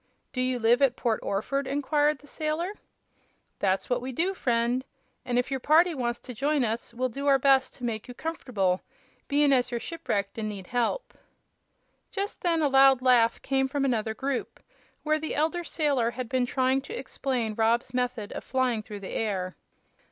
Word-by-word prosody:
"Do 255 - -1
you 255 0 +1
live 240 +2 +3
at 265 -3 +4
Port 230 -4 0
Orford?" 270 +8 -1
inquired 290 +2 +1
the 290 - -19
sailor. 315 +6 -2 0.9
"That's 190 -1 +1
what 245 -1 0
we 260 +1 -4
do, 345 +9 0
friend; 240 -4 +1 0.4
an' 245 -1 0
if 245 +2 0
your 270 - 0
party 330 +6 +4
wants 240 -4 -2
to 250 - -7
join 285 +4 +1
us 230 +1 -2
we'll 250 +2 -1
do 275 +4 -4
our 275 -1 +6
best 270 0 +3
to 250 - -13
make 225 -3 -3
you 245 - -9
comf'table, 215 - -1 0.5
bein' 285 -1 +4
as 250 -2 +2
you're 240 - -2
shipwrecked 230 -9 -3
an' 215 -1 -2
need 200 -3 -7
help." 245 - -1 1.0
Just 400 +1 -4
then 335 -3 +2
a - - +4
loud 270 -1 +6
laugh 245 -3 +4
came 270 0 +1
from 275 0 -1
another 220 -4 0
group, 270 0 -3 0.4
where 310 0 +2
the 315 - -3
elder 325 +4 0
sailor 285 -8 +1
had 245 +1 -5
been 255 0 0
trying 260 +1 +1
to 435 - -7
explain 245 - -2
Rob's 230 +3 +1
method 250 -4 -2
of - - -6
flying 255 -4 0
through 205 -1 -9
the 190 - -7
air. 190 -4 -2
255 Hz, 185 wpm, -27 LUFS, 235-285 Hz, 1.0 s, our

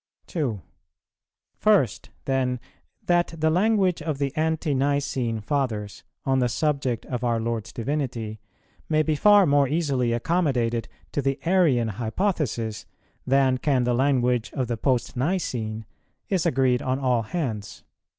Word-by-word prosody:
2. 130 - -2 1.0
First - - +2 0.2
then, 130 -2 0 0.5
that 175 -1 +2
the 160 0 +2
language 190 -1 +2
of 155 -2 -2
the 140 0 -2
Ante 160 -1 0
nicene 135 -4 0
Fathers, 110 -5 -2 0.2
on 135 -1 +2
the 125 -1 +2
subject 140 -4 -1
of 125 -1 -4
our 120 -2 +1
Lord's 115 -3 -3
Divinity, 120 -4 -3 0.5
may 155 -1 +3
be 155 - +1
far 205 +5 +6
more 140 -2 +3
easily 140 -5 0
accommodated 120 -4 0 0.2
to 145 - -1
the 135 +1 -1
Arian 160 -11 +3
hypothesis 115 - -2 0.4
than 130 -1 +3
can 135 -3 +2
the 120 0 +1
language 125 -2 +2
of 130 - -1
the 120 0 -2
Post 125 +2 0
nicene, 120 - -2 0.4
is 185 -3 +1
agreed 130 -4 +2
on 130 0 0
all 125 -3 +1
hands. 115 - -4
130 Hz, 135 wpm, -25 LUFS, 120-155 Hz, 1.0 s, far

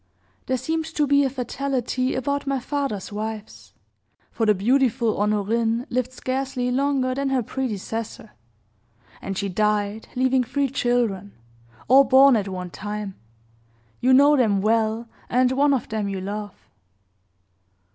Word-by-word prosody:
There 260 - +1
seemed 320 +5 -2
to 300 - +2
be 285 0 +4
a 270 - +1
fatality 255 0 -2
about 280 +2 -2
my 275 -1 0
father's 265 -7 -3
wives; 215 0 -7 0.6
for 225 - -1
the 210 - +5
beautiful 240 +1 +1
Honorine 225 +3 0
lived 255 0 -1
scarcely 255 -1 -2
longer 265 -1 +1
than 275 +1 -1
her 260 -2 +1
predecessor, 225 -2 -5 0.9
and 195 -1 -5
she 200 - -1
died, 210 +2 -1
leaving 260 0 +2
three 280 +3 -1
children 240 -7 0 0.5
all 270 +2 +7
born 270 0 +6
at 205 -3 -1
one 180 -2 -6
time 210 0 -5 0.9
you 255 - +2
know 285 +3 +6
them 220 -7 +2
well, 220 +2 +1 0.2
and 250 +1 +3
one 280 +2 +3
of 265 -3 0
them 215 -2 -2
you 195 -1 -3
love. 205 +1 -5
245 Hz, 135 wpm, -23 LUFS, 210-265 Hz, 0.9 s, all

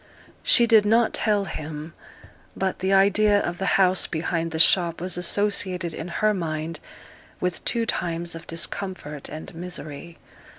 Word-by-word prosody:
She 240 - +5
did 220 -2 +5
not 225 +2 +3
tell 205 -2 +1
him; 155 -1 -7 0.6
but 190 -1 -2
the 190 +1 0
idea 205 +2 +4
of 175 -3 -3
the 195 - -1
house 185 -1 +3
behind 165 0 -2
the 160 - -4
shop 170 +1 +4
was 185 +2 -2
associated 185 -1 0
in 160 - -6
her 215 +5 +1
mind 160 -3 -4 0.6
with 180 -1 -2
two 230 -1 +1
times 170 -4 -2
of 165 - -10
discomfort 165 -3 -5
and 155 +1 -8
misery. 170 -2 -8
180 Hz, 145 wpm, -24 LUFS, 165-200 Hz, 0.6 s, She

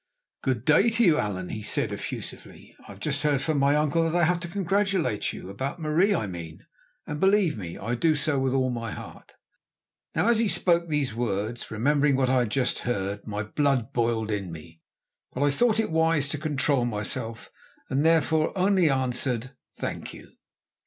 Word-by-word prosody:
"Good 130 -3 -1
day 150 +10 +5
to 230 +1 +2
you, 165 -7 +5
Allan," 95 -3 -3
he 110 - -5
said - - 0
effusively. - - -7
"I - - -9
have 100 - -15
just 145 +5 -2
heard 145 -2 +2
from 155 0 0
my 140 +1 +3
uncle 150 +2 +2
that 165 +1 -1
I 175 - +3
have 175 +2 +2
to 170 - -5
congratulate 190 - 0
you, - - -9
about 135 - -4
Marie 170 +6 +2
I 110 - -1
mean, 85 -4 -8 0.4
and, 150 0 -5
believe 190 -3 +3
me, 90 -6 -7
I 115 +4 -3
do 155 +6 +2
so 145 -1 0
with 130 -1 +1
all 130 -1 +1
my 115 -1 -4
heart." - - -10 0.8
Now, - - +2
as 235 -2 +4
he 230 - +2
spoke 170 -3 +1
these 150 -6 0
words, 110 0 -3
remembering 140 +5 +2
what 130 -1 +2
I 130 - +4
had 120 -3 0
just 125 +2 0
heard, 100 -3 -3
my 105 0 -3
blood 135 +2 0
boiled 115 -2 0
in 100 -4 -3
me, 80 0 -11 0.5
but 135 - -1
I 145 - +3
thought 225 +8 +2
it 220 - 0
wise 160 -2 +2
to 150 - -3
control 145 -3 +1
myself, 115 +1 -4 0.4
and 135 +2 0
therefore 160 +1 +2
only 185 -3 +3
answered: 125 -2 -1 0.3
"Thank - - -5
you." - - -14
140 Hz, 190 wpm, -26 LUFS, 115-160 Hz, 0.8 s, day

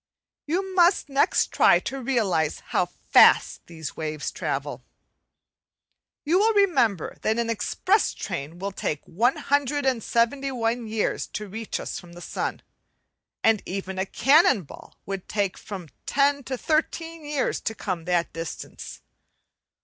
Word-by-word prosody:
We 335 +5 +1
must 355 -3 +4
next 275 0 +2
try - - +6
to 270 0 -5
realize 205 - 0
how - - +2
fast - - +4
these 160 -3 -7
waves 155 -1 -4
travel. - - -4 1.4
You 340 +5 +3
will 440 +1 +3
remember 240 - +2
that 220 +1 +1
an 235 -1 0
express 375 - +1
train 165 -3 -5
would 195 +1 -5
take 150 - -3
171 250 - 0
years 215 -1 -1
to 210 - -6
reach 220 +3 -5
us - - -5
from 175 -1 -14
the 175 - -11
sun; - - -4 0.8
and 225 -3 +4
even 190 0 -4
a 190 - -1
cannon 275 - +4
ball 140 - -13
would 195 -2 -6
take 200 -3 0
from 190 -5 -8 0.2
ten 280 0 +2
to 260 -1 -3
thirteen 325 +2 -1
years 295 -2 -1
to 220 - -3
come 180 -6 -4
that 175 -1 0
distance. 165 -1 -7
225 Hz, 135 wpm, -25 LUFS, 185-285 Hz, 1.4 s, try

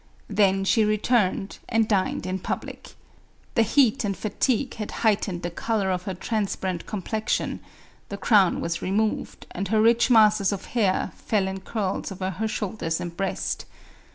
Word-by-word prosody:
Then 195 -2 +3
she 205 +3 +3
returned, 210 -2 +1
and 225 -2 +2
dined 195 -4 0
in 185 +1 -2
public. - - -6 0.6
The 230 - +3
heat 230 +1 +3
and 200 -2 -2
fatigue 245 +4 0
had 210 -2 -4 0.2
heightened 195 -4 +1
the 175 - -3
color 200 +1 -1
of 180 0 -2
her 190 - -3
transparent 190 -3 -2
com 205 -4 -4
plexion, 220 +4 -1 0.5
the 200 - -5
crown 200 -2 +3
was 170 0 -2
remo'ved, 210 +3 -1
and 195 +2 -3
her 215 +3 +2
rich 230 +3 +4
masses 215 -4 +5
of 200 - -4
hair 205 -6 +1
fell 200 -3 0
in 190 0 -4
curls 195 0 -3
over 190 0 -3
her 220 +5 -2
shoulders 200 -6 -2
and 170 -1 -5
breast. 195 +2 -2
200 Hz, 160 wpm, -25 LUFS, 190-220 Hz, 0.6 s, masses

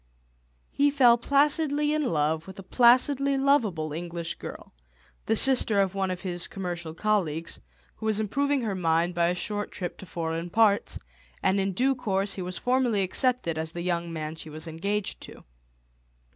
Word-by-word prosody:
He 285 +1 +3
fell 255 -4 +5
placidly 295 +2 +2
in 305 - 0
love 160 - 0
with 190 - -10
a 195 - -9
placidly 260 +5 +4
lovable 215 - +1
English 170 +1 -4
girl, - - -9 0.5
the 220 - +2
sister 240 -4 +4
of 195 -1 +1
one 195 -1 -1
of 185 0 -4
his 175 -2 -3
commercial 175 -4 -5
colleagues, 170 -5 -1 0.4
who 220 - -4
was 215 -1 +2
improving 280 +6 0
her 215 -3 -1
mind 170 -1 +1
by 170 -1 +2
a 175 - 0
short 205 +3 -3
trip 180 -3 -5
to 190 - -10
foreign 165 0 -4
parts, 210 +1 +2 0.5
and 190 +1 +2
in 195 0 -1
due 260 +7 +2
course 195 -5 -1
he 190 - -5
was 180 0 -5
formally 245 -5 +1
accepted 190 -4 0
as 160 0 -4
the 170 - -5
young 170 -1 -2
man 155 -1 -5
she 160 - -8
was 155 +2 -7
engaged 200 +6 -3
to. - - -10
195 Hz, 170 wpm, -27 LUFS, 170-245 Hz, 0.5 s, fell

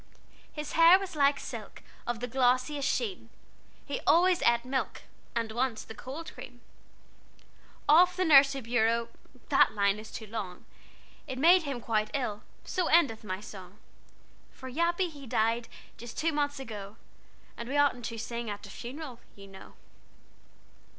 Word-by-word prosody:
"His 300 -1 -6
hair 335 +2 +7
was 380 -3 -6
like 280 -1 +3
silk 230 -5 -8 0.2
Of 240 -1 -2
the 245 - -2
glossiest 255 +3 +1
sheen, 415 -6 -2 0.6
He - - -4
always 355 +1 +5
ate 235 0 +3
milk, 265 +1 -3 0.3
And 230 -2 -1
once 240 0 -1
the - - -10
cold 275 +9 -8
cream 245 -1 -11 1.3
"Off 355 +4 +6
the 370 - 0
nursery 275 -3 +6
bureau 230 0 +1 0.4
(That - - +4
line 200 0 +2
is 220 +1 -11
too 220 - -7
long!) 205 -4 -6 0.6
It 260 -2 -5
made 345 +6 +6
him 275 -4 -3
quite 215 -2 -1
ill, 220 -7 -2 0.2
So 365 -2 -1
endeth 275 -11 +3
my 185 -1 -4
song. 195 -2 -11 0.7
"For 260 - -11
Yappy 340 +5 +1
he 280 -3 -11
died 230 +1 0 0.3
Just 235 -1 -9
two 330 +1 +1
months 290 -1 -1
ago, 210 -5 -8 0.6
And 235 +1 -7
we 285 - -1
oughtn't 275 -5 +2
to 230 - -5
sing 235 0 -4
At 205 0 -6
a 200 - -11
funeral, 255 +1 -8 0.2
you 200 - -12
know." 195 -1 -13
245 Hz, 155 wpm, -29 LUFS, 220-290 Hz, 1.3 s, hair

